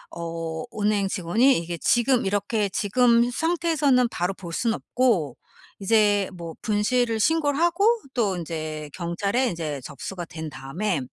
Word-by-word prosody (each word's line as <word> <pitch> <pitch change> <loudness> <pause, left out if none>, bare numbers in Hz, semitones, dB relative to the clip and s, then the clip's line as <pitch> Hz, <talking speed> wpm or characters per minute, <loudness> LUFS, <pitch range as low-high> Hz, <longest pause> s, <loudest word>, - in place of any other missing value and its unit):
어 165 -1 -4 0.2
은행 205 -1 +2
직원이 205 +9 +2
"이게 170 0 -5
지금 240 +5 +2
이렇게 205 +2 0
지금 235 +4 +3
상태에서는 305 -4 +2
바로 180 -1 -2
볼 175 -3 -9
순 230 +3 0
없고 215 - 0 0.4
이제 205 -1 +3
뭐 170 -2 -8
분실을 225 +2 +1
신고를 295 0 +2
하고 345 +4 +3 0.3
또 210 -6 +1
인제 155 -2 -5
경찰에 200 +8 -1
인제 160 -6 -4
접수가 175 +5 -6
된 160 -1 -7
다음에 155 +7 -3
205 Hz, 280 characters per minute, -24 LUFS, 170-245 Hz, 0.4 s, 지금